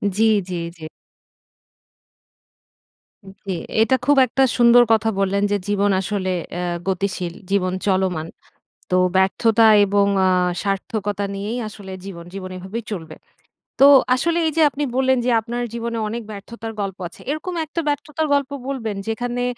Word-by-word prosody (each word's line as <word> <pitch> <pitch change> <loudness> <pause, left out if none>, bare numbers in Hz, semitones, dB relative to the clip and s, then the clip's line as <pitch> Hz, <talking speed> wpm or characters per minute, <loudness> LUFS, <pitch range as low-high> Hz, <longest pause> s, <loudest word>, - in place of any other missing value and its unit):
জি, 220 - +2 0.3
জি, 180 - -3 0.2
জি। 160 - -9 2.4
জ্বী। 195 -1 -7 0.3
এটা 245 +4 +4
খুব 290 0 +4
একটা 265 +3 +1
সুন্দর 240 0 +7
কথা 225 0 +2
বললেন, 200 +1 +1
যে 205 - +2
জীবন 205 0 +1
আসলে 195 -2 -2 0.2
অ্যা 175 - -3 0.2
গতিশীল। 185 -2 -2 0.2
জীবন 185 -2 +1
চলমান। 185 -4 0 0.6
তো 180 - +3 0.2
ব্যর্থতা 220 +4 +3 0.2
এবং 200 0 +2 0.2
আ - - +4 0.3
সার্থকতা 200 +1 -2
নিয়েই 210 +5 -4
আসলে 200 -3 -10
জীবন, 170 -4 -8
জীবন 185 -1 -6
এভাবেই 190 +5 -6
চলবে। 160 -5 -6 0.6
তো 275 - +8 0.3
আসলে 335 +6 0
এই - - 0
যে 320 - +4
আপনি 290 +1 -4
বললেন 260 0 +3
যে 250 - +2
আপনার 240 +2 -4
জীবনে 235 0 -3
অনেক 230 +2 -4
ব্যর্থতার 225 +2 -8
গল্প 195 -2 -4
আছে। - - -17
এরকম 310 +5 -4
একটা 315 +2 -5
ব্যর্থতার 300 +2 -1
গল্প 280 -1 +1 0.2
বলবেন, 230 -6 -3
যেখানে 245 +2 -2
210 Hz, 145 wpm, -21 LUFS, 190-245 Hz, 2.4 s, তো